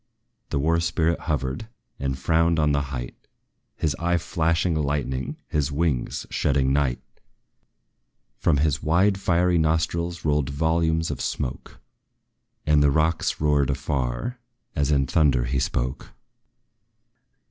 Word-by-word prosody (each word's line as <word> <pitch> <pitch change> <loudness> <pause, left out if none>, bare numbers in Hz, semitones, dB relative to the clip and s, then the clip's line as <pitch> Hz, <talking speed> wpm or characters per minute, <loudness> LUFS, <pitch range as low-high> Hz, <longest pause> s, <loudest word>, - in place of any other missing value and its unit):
The - - -1
war 80 +4 +2
spirit 85 0 +1
hovered, 70 - -2 0.3
and 65 -1 -2
frowned 80 +4 +2
on 75 -1 +3
the 70 0 +2
height, - - -5 0.6
His 75 -4 -1
eye 85 +1 +1
flashing 85 0 0
lightning 70 -4 -2
his 75 -2 -1
wings 70 -4 -1
shedding 70 -1 +1
night! 70 -4 +1 1.4
From 75 - +2
his 75 0 +1
wide 95 +5 +2
fiery 90 -2 +2
nostrils 80 +1 0
rolled 75 -2 +1
volumes 80 +2 +1
of 65 - -5
smoke, 65 +1 -4 0.9
And 75 -1 +4
the 70 - +5
rocks 80 +3 +1
roared 75 -2 +2
afar, 70 - -2 0.4
as 70 -2 +1
in 70 -2 +3
thunder 70 -4 +3
he 65 +2 0
spoke. 65 +1 -2
75 Hz, 125 wpm, -24 LUFS, 70-85 Hz, 1.4 s, the